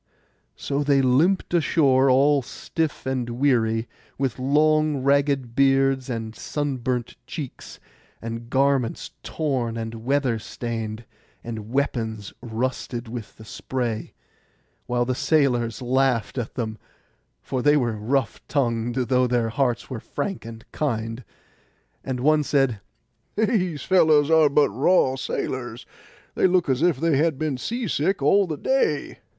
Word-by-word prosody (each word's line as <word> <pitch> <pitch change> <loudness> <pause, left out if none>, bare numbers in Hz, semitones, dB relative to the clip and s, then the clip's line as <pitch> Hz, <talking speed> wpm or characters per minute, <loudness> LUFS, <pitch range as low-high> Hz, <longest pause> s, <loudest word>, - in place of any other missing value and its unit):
So 140 0 -2
they 140 -1 +3
limped 160 +10 +2
ashore, 140 -5 +3
all 140 +2 +4
stiff 160 +4 -4
and 130 -2 -2
weary, 115 -3 +1 0.3
with 130 -2 -2
long 150 +1 +2
ragged 140 -3 +1
beards 135 -1 +3
and 115 -2 -4
sunburnt 130 -4 -3
cheeks, 145 -4 -7 0.4
and 115 +1 -6
garments 135 -3 +1
torn 130 -7 -2
and 115 0 -6
weather 130 -3 +1
stained, 115 0 -5 0.4
and 110 -2 -6
weapons 115 -6 -2
rusted 120 0 -3
with 115 -2 -7
the 110 - -12
spray, 120 -1 -4 0.7
while 120 0 +1
the 130 - 0
sailors 125 -5 +1
laughed 130 -2 +1
at 115 - -5
them 110 -3 -4 0.6
(for 130 - -2
they 145 +3 +4
were 120 -5 0
rough 130 +6 -1
tongued, 120 -4 0
though 125 0 +2
their 120 -2 +1
hearts 120 0 0
were 125 - -4
frank 195 - -4
and 115 -1 -10
kind). 115 -4 -2 0.8
And 130 -2 -3
one 155 +3 +4
said, 135 -7 +1 0.5
'These 185 - 0
fellows 155 -5 +4
are 160 -2 +6
but 145 +1 +3
raw 135 - +3
sailors; 125 -2 -4 0.5
they - - +3
look 180 -4 +2
as 130 +1 +1
if 170 -4 +3
they 165 0 +2
had 155 -1 +1
been 145 -3 -2
sea 235 - -3
sick 170 0 0
all 195 +7 +4
the 155 -3 -4
day. 155 - 0
130 Hz, 135 wpm, -24 LUFS, 120-145 Hz, 0.8 s, are